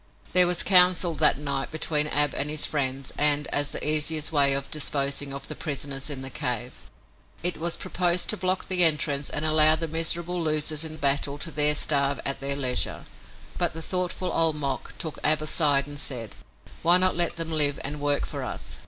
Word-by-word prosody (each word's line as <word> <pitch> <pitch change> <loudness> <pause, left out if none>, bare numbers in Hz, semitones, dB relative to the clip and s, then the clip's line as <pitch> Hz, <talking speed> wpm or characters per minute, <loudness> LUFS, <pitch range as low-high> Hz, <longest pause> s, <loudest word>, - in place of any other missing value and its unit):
There 180 0 +6
was 180 -1 +2
council 180 -2 +4
that 155 -2 +3
night 140 -1 -3
between 155 -1 -1
Ab 145 -1 +1
and 145 - -3
his 150 0 +2
friends 135 -2 -3
and, 150 0 +3
as 145 0 +3
the - - -1
easiest 155 0 +2
way 140 -3 +3
of 140 0 -5
disposing 140 -1 -1
of 140 0 -8
the - - -6
prisoners 140 -2 -5
in 135 -2 -5
the 135 - -5
cave, 125 0 -2 0.7
it 180 0 +3
was 170 +1 0
proposed 175 0 0
to - - +4
block 185 -1 -3
the 180 -1 +1
entrance 150 -3 0
and 150 - -3
allow 155 0 +4
the 165 +1 -5
miserable 170 +2 -1
losers 155 -1 -2
in 155 -1 -5
battle 140 0 0
to 165 +3 -4
there 150 0 +5
starve 140 -1 0
at 140 - 0
their 140 0 -1
leisure. 130 -3 -2 0.5
But - - +1
the 165 - -5
thoughtful 180 0 -3
Old 165 -2 +2
Mok 140 -3 -5
took 160 -2 -6
Ab 155 0 +3
aside 145 -2 +3
and 145 0 -7
said: 120 -7 -3 0.5
"Why 175 +2 +5
not 185 0 +3
let 175 0 +2
them 165 -1 -4
live 145 -3 0
and 145 +2 -3
work 145 0 -1
for - - -7
us? - - -7
150 Hz, 195 wpm, -24 LUFS, 140-165 Hz, 0.7 s, There